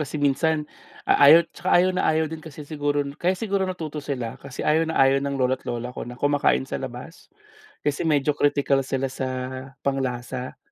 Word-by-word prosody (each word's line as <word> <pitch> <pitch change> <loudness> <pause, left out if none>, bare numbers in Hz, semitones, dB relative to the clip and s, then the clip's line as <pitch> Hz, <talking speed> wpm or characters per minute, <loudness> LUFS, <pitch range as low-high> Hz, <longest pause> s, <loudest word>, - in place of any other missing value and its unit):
kasi 150 0 -3
minsan 150 +2 +1 0.4
a 140 - +6
ayaw, 165 +2 +8
saka 175 +1 -5
ayaw 180 +1 +4
na 185 - +1
ayaw 160 0 +2
din 160 +1 -6
kasi 155 -1 -10
siguro 145 -1 -1
nu 140 - -6
kaya 185 +2 +1
siguro 200 -2 -1
natuto 160 -5 -5
sila, 125 -6 -4
kasi 135 -2 -7
ayaw 160 +1 +2
na 160 - -3
ayaw 135 0 +4
ng 140 0 -2
lolo't 130 0 +1
lola 120 +1 -3
ko - - -6
na 120 - -8
kumakain 145 0 +2
sa 135 - -5
labas. 130 +6 -9 0.5
Kasi 145 +1 -1
medyo 150 -2 +2
kritikal 140 -1 +2
sila 135 0 -1
sa 130 0 -4 0.5
pang-lasa. 130 -2 -3
145 Hz, 190 wpm, -24 LUFS, 135-160 Hz, 0.5 s, ayaw